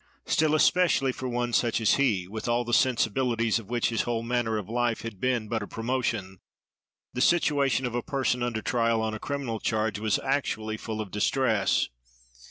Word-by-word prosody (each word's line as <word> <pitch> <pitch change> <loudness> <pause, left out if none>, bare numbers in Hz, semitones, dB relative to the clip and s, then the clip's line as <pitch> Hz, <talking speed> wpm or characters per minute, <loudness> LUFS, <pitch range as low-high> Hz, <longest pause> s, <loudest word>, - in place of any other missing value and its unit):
Still, 155 -1 +2
especially 155 -3 +3
for 130 0 -5
one 120 0 -2
such 115 -1 +2
as 110 - +3
he, 105 -10 +1
with 110 +4 -6
all 120 +1 +1
the 120 - -4
sensibilities 115 -2 +2
of 110 -2 -13
which 120 -1 +1
his 115 - 0
whole 115 -1 -2
manner 115 -2 0
of 105 -3 -5
life 120 0 0
had 115 -5 -7
been 125 -4 0
but 110 +1 -2
a 105 - -5
promotion, 115 -6 -2 0.7
the 125 - -2
situation 140 -5 +2
of 120 - -3
a 120 - -1
person 135 -3 -1
under 120 -3 -2
trial 115 -2 +1
on 110 0 -2
a 110 - -5
criminal 135 -5 -3
charge 110 -2 -1
was 110 -1 +1
actually 120 -6 -1
full 110 0 -4
of 100 -4 -7
distress. 105 -1 +1
120 Hz, 185 wpm, -27 LUFS, 110-130 Hz, 0.7 s, especially